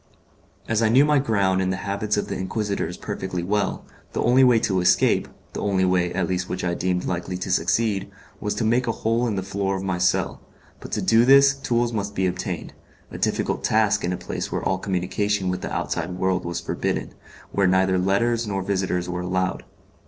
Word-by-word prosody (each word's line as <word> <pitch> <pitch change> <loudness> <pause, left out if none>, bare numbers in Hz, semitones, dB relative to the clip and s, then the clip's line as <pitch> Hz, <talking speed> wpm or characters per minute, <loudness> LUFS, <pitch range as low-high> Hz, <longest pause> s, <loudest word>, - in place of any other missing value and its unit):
As 115 0 +1
I 110 - +3
knew 130 +5 +6
my 150 -1 +3
ground 100 -7 +1
and 95 0 0
the 95 - -2
habits 105 +1 -1
of 105 - -1
the - - -4
Inquisitors 100 +2 -3
perfectly 90 -2 -4
well, 105 +3 -1 0.3
the - - -1
only 125 +3 +5
way 125 -2 +6
to 95 -2 +1
escape 90 - +3 0.3
the - - -4
only 95 -2 +1
way 90 -1 +1
at 90 -1 -1
least 90 0 -2
which 90 - -3
I 90 -1 0
deemed 90 0 -1
likely 90 +1 -3
to 90 - -4
succeed 110 -4 +1 0.3
was 105 - -2
to - - -1
make 120 +3 +2
a - - +2
hole 115 +2 +2
in 110 - -1
the 95 - -2
floor 100 0 -2
of 95 - -4
my 95 -2 -2
cell; 90 0 +1 0.4
but - - -10
to - - -1
do 115 +1 +5
this 135 +2 +7
tools 120 -3 -1
must 100 -1 -3
be 95 - +1
obtained 90 -1 -3 0.4
a - - -7
difficult - - -1
task 105 -2 +2
in 90 - 0
a 90 - -2
place - - -5
where - - -2
all 95 0 0
communication 95 +1 -1
with 90 0 -2
the - - -5
outside 85 +2 -3
world 95 -1 0
was 85 0 -3
forbidden, - - -3 0.4
where 100 -1 +2
neither 95 0 +3
letters 115 +5 +1
nor 95 -2 -2
visits 95 -2 -1
were 90 0 -3
allowed. 95 +1 -1
95 Hz, 210 wpm, -23 LUFS, 90-110 Hz, 0.4 s, this